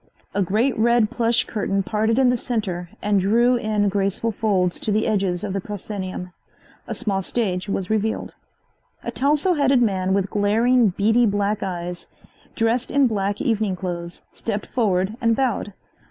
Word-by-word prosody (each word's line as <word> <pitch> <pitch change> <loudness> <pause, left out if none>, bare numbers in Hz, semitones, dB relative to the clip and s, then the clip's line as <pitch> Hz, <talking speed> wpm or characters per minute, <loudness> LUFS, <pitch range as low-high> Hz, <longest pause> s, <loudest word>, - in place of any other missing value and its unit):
A 200 - 0
great 220 +8 +1
red 235 -1 +3
plush 235 0 +2
curtain 195 -2 -1
parted 220 +3 0
in 260 -2 +4
the - - +2
center 200 -8 -3
and 205 -1 +2
drew 235 +6 +3
in 215 -3 0
graceful 200 +3 0
folds 195 -4 0
to 215 - -2
the 215 +1 +1
edges 190 -4 0
of 200 -2 -3
the 195 - -2
proscenium. 185 -3 -6 0.5
A - - -4
small 195 -2 -1
stage 190 -2 -2
was 195 0 -2
revealed. 220 0 -1 0.7
A - - -3
tousle 295 +6 +2
headed 270 -3 +4
man 190 -3 +1
with 195 -1 -1
glaring, 225 +4 +3
beady 225 +6 +3
black 205 +1 0
eyes, 175 -2 -4 0.5
dressed 230 +2 +1
in 280 -1 +3
black 205 -3 -1
evening 215 -4 0
clothes 175 -2 -6
stepped 210 -2 -4
forward 200 -4 0
and 230 -1 +3
bowed. 245 -5 -1
210 Hz, 160 wpm, -22 LUFS, 195-230 Hz, 0.7 s, in